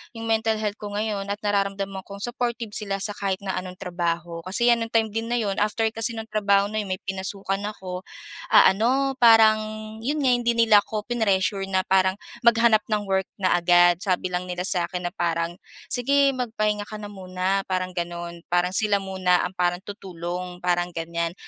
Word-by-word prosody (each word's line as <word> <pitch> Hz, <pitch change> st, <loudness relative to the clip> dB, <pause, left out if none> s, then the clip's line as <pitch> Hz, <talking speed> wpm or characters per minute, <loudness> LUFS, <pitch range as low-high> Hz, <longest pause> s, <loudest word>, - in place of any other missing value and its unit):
yung 225 Hz, 0 st, -5 dB
mental 220 Hz, 0 st, +2 dB
health 210 Hz, 0 st, -3 dB
ko 205 Hz, -1 st, -6 dB
ngayon 205 Hz, -2 st, -2 dB
at 205 Hz, -, -10 dB
nararamdam 200 Hz, -1 st, 0 dB, 0.2 s
kong 200 Hz, 0 st, -8 dB
supportive 240 Hz, -2 st, -3 dB
sila 200 Hz, -2 st, -2 dB
sa 210 Hz, -, -2 dB
kahit 195 Hz, -1 st, -2 dB
na 195 Hz, -, -2 dB
anong 185 Hz, 0 st, -8 dB
trabaho, 170 Hz, -2 st, -3 dB
kasi 235 Hz, +6 st, +3 dB
'yan 235 Hz, -, +3 dB
nung 225 Hz, -, -13 dB
time 225 Hz, -1 st, +2 dB
din 225 Hz, +2 st, -3 dB
na 240 Hz, -, 0 dB
'yon 205 Hz, -5 st, -1 dB
after 215 Hz, +2 st, 0 dB
kasi 225 Hz, +1 st, -2 dB
nung 225 Hz, 0 st, -7 dB
trabaho 200 Hz, -1 st, +2 dB
na 215 Hz, -, -1 dB
yon 210 Hz, -, -3 dB
may 185 Hz, -, -6 dB
pinasukan 195 Hz, 0 st, -3 dB
ako, 185 Hz, -3 st, -6 dB, 0.5 s
ah, -, -, +8 dB
ano 260 Hz, +7 st, +1 dB
parang 225 Hz, -2 st, +7 dB, 0.4 s
yun 290 Hz, +7 st, -1 dB
nga 260 Hz, -, +4 dB
hindi 235 Hz, -1 st, +1 dB
nila 225 Hz, -2 st, +6 dB
ako 215 Hz, 0 st, -4 dB
prinessure 195 Hz, -4 st, +1 dB
na 190 Hz, -1 st, +1 dB
parang 190 Hz, 0 st, +2 dB, 0.3 s
maghanap 230 Hz, -1 st, +5 dB
ng 215 Hz, -2 st, 0 dB
work 190 Hz, -1 st, +1 dB
na 185 Hz, -2 st, +3 dB
agad. 175 Hz, 0 st, +5 dB
Sabi 185 Hz, -1 st, -1 dB
lang 180 Hz, 0 st, -2 dB
nila 180 Hz, 0 st, -3 dB
sa'kin 180 Hz, -1 st, -1 dB
na -, -, -24 dB
parang 170 Hz, -2 st, -1 dB, 0.4 s
sige 275 Hz, +3 st, +3 dB
magpahinga 215 Hz, -4 st, -1 dB
ka 215 Hz, -, -8 dB
na 205 Hz, 0 st, -7 dB
muna 190 Hz, 0 st, -2 dB
parang 185 Hz, -1 st, -1 dB
gano'n, 170 Hz, -1 st, -5 dB
parang 175 Hz, 0 st, +3 dB
sila 205 Hz, 0 st, +2 dB
muna 185 Hz, -2 st, +1 dB
ang 180 Hz, -, -5 dB
parang 175 Hz, 0 st, +1 dB
tutulong 180 Hz, -2 st, -6 dB
parang 175 Hz, 0 st, 0 dB
gan'yan. 170 Hz, 0 st, -3 dB
195 Hz, 190 wpm, -24 LUFS, 180-220 Hz, 0.5 s, ah